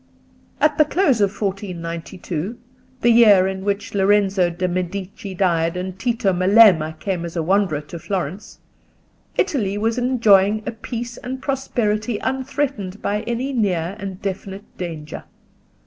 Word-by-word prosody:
At 300 0 +2
the - - +8
close 295 - +2
of 200 - +4
1492, 185 -1 -4 0.4
the 240 - +5
year 210 -5 +7
in 190 0 -3
which 200 0 -2
Lorenzo 195 -2 +3
de' 175 +2 -2
Medici 185 +2 -4
died 170 -2 +1
and 185 +1 -5
Tito 225 -5 +1
Melema 185 -4 +5
came 185 -4 -2
as 170 0 -6
a 165 - 0
wanderer 185 -4 +1
to 160 +3 -9
Florence, 180 +1 -4 0.8
Italy 210 - 0
was 225 +3 0
enjoying 215 -4 +4
a - - -2
peace 235 +1 -6
and 260 +1 -6
prosperity 240 -5 -1
unthreatened 260 -6 -2
by 210 +1 0
any 250 +4 -2
near 190 -6 0
and 190 -2 -6
definite 195 0 -6
danger. 160 -4 -6
200 Hz, 135 wpm, -21 LUFS, 180-230 Hz, 0.8 s, the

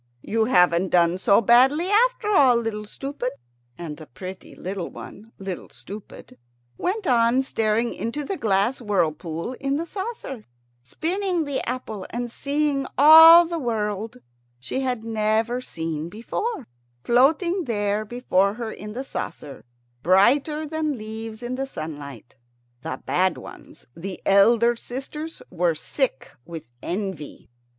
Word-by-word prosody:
"You 225 0 +1
haven't 180 -4 +3
done 175 0 +3
so 200 +2 +4
badly 260 - +5
after 440 0 +2
all, 270 -10 +5
Little 225 -2 -2
Stupid." 270 +2 -5 0.4
And 160 -4 -7
the 155 -4 -12
little - - -43
pretty 185 0 -9 0.4
one, 220 +3 -11
Little 195 -2 -6
Stupid, 200 - -11 0.4
went 395 +3 -2
on 245 -1 +3
staring 225 -2 0
into 265 +6 -4
the 385 - -3
glass 215 - 0
whirlpool 170 -2 -1
in 275 0 -1
the 330 - -3
saucer, 380 - -6 0.4
spinning 350 - -2
the 285 -2 -2
apple, 220 -6 -5
and 240 0 -4
seeing 280 0 -1
all 320 +4 +10
the 335 0 -3
world 220 -2 -3 0.4
she 125 - -4
had 250 -4 -2
never 225 +2 0
seen 160 -6 -5
before, 285 - -4 0.4
floating 320 +9 +3
there 205 -3 -1
before 210 -4 0
her 230 -1 -5
in 210 0 -8
the 255 +4 -4
saucer, 150 - -7 0.4
brighter 265 - +3
than 310 -2 -2
leaves 220 +1 -7
in 255 +2 -3
sunlight. 145 - -8 0.4
The 160 - -6
bad 185 -1 +1
ones, - - -12
the 185 +2 -7
elder 230 +4 +5
sisters, 275 +7 -7
were 175 -2 +1
sick 235 - -2
with 160 -7 -10
envy. 185 - -5
230 Hz, 130 wpm, -23 LUFS, 190-275 Hz, 0.4 s, all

